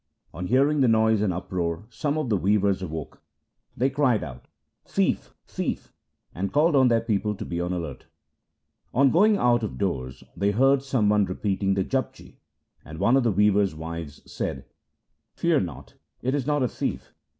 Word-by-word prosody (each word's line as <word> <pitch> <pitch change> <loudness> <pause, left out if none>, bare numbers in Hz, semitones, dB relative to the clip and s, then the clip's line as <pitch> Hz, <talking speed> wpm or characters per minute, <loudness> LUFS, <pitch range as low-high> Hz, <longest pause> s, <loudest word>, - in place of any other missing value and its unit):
On 90 +3 -5
hearing 140 +5 +3
the 130 - +4
noise 110 -1 +3
and 105 -3 +1
uproar, 85 0 -3
some 145 +6 -2
of 150 -6 -2
the 105 - +2
weavers 100 +1 +1
awoke. 80 -4 -6 0.6
They 130 +3 +1
cried 135 -5 +2
out, 65 -3 -9 0.2
' - - -55
Thief! - - 0
thief! - - -4 0.2
' - - -44
and 95 +3 -3
called 150 +2 +3
on 130 -2 +5
their 115 -2 +3
people 105 -1 -1
to - - -6
be 85 0 -3
on 90 - -2
the 90 - -1
alert. 80 -6 -7 0.9
On 135 +1 +5
going 205 +5 +4
out 120 -5 +3
of 110 - -4
doors 65 -10 -3
they 100 - +1
heard 135 +6 +3
some 130 -6 0
one 105 -1 +3
repeating 95 +1 -1
the 95 - +1
Japji, 130 +4 -4 0.5
and 80 +1 -10
one 120 +9 +3
of 135 - +4
the 120 -2 +2
weavers' 100 -2 +2
wives 80 -2 -7
said, 65 - -5 0.3
' - - -53
Fear 170 -3 +2
not, 85 -6 -6 0.3
it 130 +2 0
is 140 -2 -1
not 145 -2 +1
a - - +2
thief. - - -4
105 Hz, 190 wpm, -25 LUFS, 90-130 Hz, 0.9 s, on